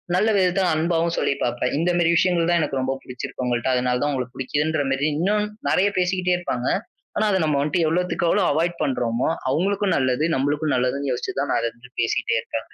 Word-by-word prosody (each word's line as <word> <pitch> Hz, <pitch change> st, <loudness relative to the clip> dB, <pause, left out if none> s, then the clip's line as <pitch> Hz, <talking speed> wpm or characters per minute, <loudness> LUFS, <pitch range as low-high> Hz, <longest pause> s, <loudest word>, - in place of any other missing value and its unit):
நல்ல 210 Hz, +5 st, +3 dB
விதத்துல 185 Hz, 0 st, +2 dB
அன்பாவும் 165 Hz, +1 st, 0 dB
சொல்லிப் 140 Hz, -, -1 dB
பார்ப்பேன். 120 Hz, +1 st, -1 dB
இந்த 170 Hz, +3 st, +1 dB
மாதிரி 170 Hz, -1 st, +3 dB
விஷயங்கள் 170 Hz, -1 st, +2 dB
தான் 175 Hz, -1 st, +3 dB
எனக்கு 140 Hz, -3 st, -1 dB
ரொம்ப 130 Hz, +1 st, 0 dB
பிடிச்சிருக்கு 125 Hz, 0 st, -6 dB
உங்கள்ட்ட. 120 Hz, 0 st, 0 dB
அதனாலதான் 125 Hz, +3 st, 0 dB
உங்களை 130 Hz, -2 st, -2 dB
பிடிக்கிறதுன்ற 150 Hz, +3 st, -1 dB
மாரி 135 Hz, +3 st, +1 dB
இன்னும் 210 Hz, +5 st, +1 dB, 0.2 s
நிறைய 195 Hz, -, +3 dB
பேசிக்கிட்டே 180 Hz, 0 st, +1 dB
இருப்பாங்க. 130 Hz, -8 st, -3 dB, 0.5 s
ஆனா 215 Hz, -, +2 dB
அதை 190 Hz, -, +2 dB
நம்ம 150 Hz, -2 st, +1 dB
வந்துட்டு 160 Hz, +4 st, +1 dB
எவ்வளவுத்துக்கு 175 Hz, +1 st, 0 dB
எவ்வளவு 195 Hz, 0 st, +2 dB
அவாய்ட் 170 Hz, +4 st, 0 dB
பண்றோமோ, 120 Hz, -2 st, 0 dB, 0.2 s
அவங்களுக்கும் 195 Hz, +7 st, +1 dB
நல்லது, 130 Hz, +1 st, +1 dB
நம்மளுக்கும் 145 Hz, +3 st, 0 dB
நல்லதுன்னு 130 Hz, +2 st, 0 dB
யோசிச்சுதான் 135 Hz, +2 st, -2 dB
அது 115 Hz, -, 0 dB
வந்துட்டு 125 Hz, +2 st, -19 dB
பேசிக்கிட்டே 115 Hz, 0 st, 0 dB
இருப்பாங்க. 110 Hz, 0 st, -6 dB
150 Hz, 180 wpm, -23 LUFS, 130-175 Hz, 0.5 s, நல்ல